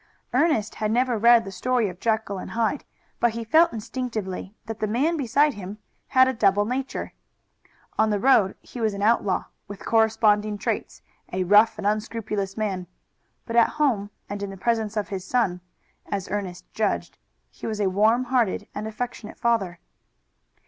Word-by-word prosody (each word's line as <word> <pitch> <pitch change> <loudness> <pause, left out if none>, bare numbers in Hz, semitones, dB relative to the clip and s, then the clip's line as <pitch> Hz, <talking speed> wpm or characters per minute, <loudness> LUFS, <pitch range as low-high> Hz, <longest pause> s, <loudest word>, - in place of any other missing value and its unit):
Ernest 255 -6 +2
had 215 - -2
never 245 +2 +2
read 235 +1 +5
the 195 - -6
story 245 +3 0
of 180 -1 -8
Jekyll 220 -3 -1
and - - -7
Hyde, 230 +5 -1 0.3
but 240 -2 +2
he 230 0 -4
felt 320 +10 +4
instinctively 220 -4 -5
that 225 -1 -6
the 215 - 0
man 275 +10 +1
beside 285 +1 +2
him 200 +1 -8 0.3
had 260 -1 +5
a 260 - +1
double 205 -3 +3
nature. 260 +4 -3 0.9
On 220 0 +4
the 210 - +1
road 210 -4 +4
he 245 - -9
was 215 -2 +1
an 200 - -3
outlaw, 210 -3 +2 0.2
with 200 -2 -9
corresponding 215 -2 +3
traits, 195 - -3 0.3
a 185 +1 0
rough 210 +4 +5
and 210 - -6
unscrupulous 210 -1 -2
man, 190 -4 -2 0.6
but 230 - -5
at 235 - +6
home 235 -10 +1 0.2
and 205 0 -5
in 200 - -3
the 195 - -8
presence 220 +1 -1
of 210 - -1
his 190 -2 -4
son, 190 -5 0 0.5
as 195 -2 -3
Ernest 190 -3 -4
judged, 215 -1 -1 0.3
he - - -8
was 215 -2 -3
a 205 - +2
warm 220 +6 +3
hearted 245 -5 0
and 215 +1 -4
affectionate 220 0 -6
father. 210 -7 0
215 Hz, 170 wpm, -25 LUFS, 200-235 Hz, 0.9 s, at